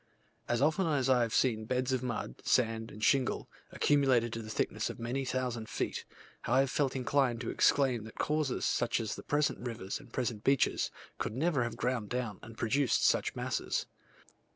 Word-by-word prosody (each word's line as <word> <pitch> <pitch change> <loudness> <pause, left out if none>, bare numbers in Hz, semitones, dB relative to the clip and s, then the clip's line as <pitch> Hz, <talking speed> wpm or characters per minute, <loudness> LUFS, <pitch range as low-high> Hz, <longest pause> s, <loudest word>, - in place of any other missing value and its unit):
As 120 +2 +2
often 160 +4 +2
as 135 -4 +2
I 125 -1 +4
have 115 -1 0
seen 110 -4 +2
beds 130 +2 0
of 130 - 0
mud, 120 - -4
sand, 115 -2 +1
and 105 +1 -9
shingle, 135 0 +2 0.2
accumulated 130 -5 +3
to 115 - -3
the 110 - -9
thickness - - -1
of - - -6
many 120 +4 -2
thousand 125 -3 -2
feet, - - -3 0.4
I 130 +3 +4
have 135 -1 0
felt 140 -3 0
inclined 130 -2 +1
to 120 - -3
exclaim 125 -6 +3
that 110 - -12
causes, 150 -3 0
such 120 - +1
as 110 -2 -2
the - - -7
present 145 0 0
rivers 115 -3 -4
and 140 -4 -15
the - - -27
present 120 -4 -2
beaches, 135 -1 +2 0.3
could 110 - -3
never 150 0 +1
have 120 -1 -2
ground 120 -4 -1
down 120 -5 -3
and 115 0 -11
produced 130 +2 +2
such - - +2
masses. - - -1
125 Hz, 190 wpm, -32 LUFS, 115-135 Hz, 0.4 s, I